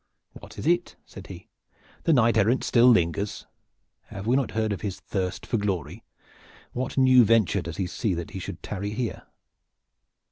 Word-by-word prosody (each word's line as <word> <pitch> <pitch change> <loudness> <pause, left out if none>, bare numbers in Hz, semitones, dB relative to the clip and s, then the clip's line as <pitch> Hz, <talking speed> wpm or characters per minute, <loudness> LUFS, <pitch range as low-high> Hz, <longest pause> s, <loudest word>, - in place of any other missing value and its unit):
"What," - - -12 0.5
said - - -12
he, - - -11 0.6
"the 165 - +4
knight 115 -4 +4
errant 110 +4 +2
still 120 0 +4
lingers? 100 -2 +2 0.6
Have 100 - -8
we 120 +3 +2
not 135 -2 +1
heard 110 -1 +1
of 100 - -6
his 100 -3 -4
thirst 95 -3 -4
for 115 - -1
glory? 95 -2 -3 0.7
What 130 +2 -4
new 130 -2 +6
venture 110 -4 +3
does 85 -1 -7
he 95 - -1
see 95 +2 -2
that 85 -1 -6
he 95 - -6
should - - -7
tarry 100 +1 -4
here?" 120 -1 -4
105 Hz, 165 wpm, -26 LUFS, 95-120 Hz, 0.7 s, new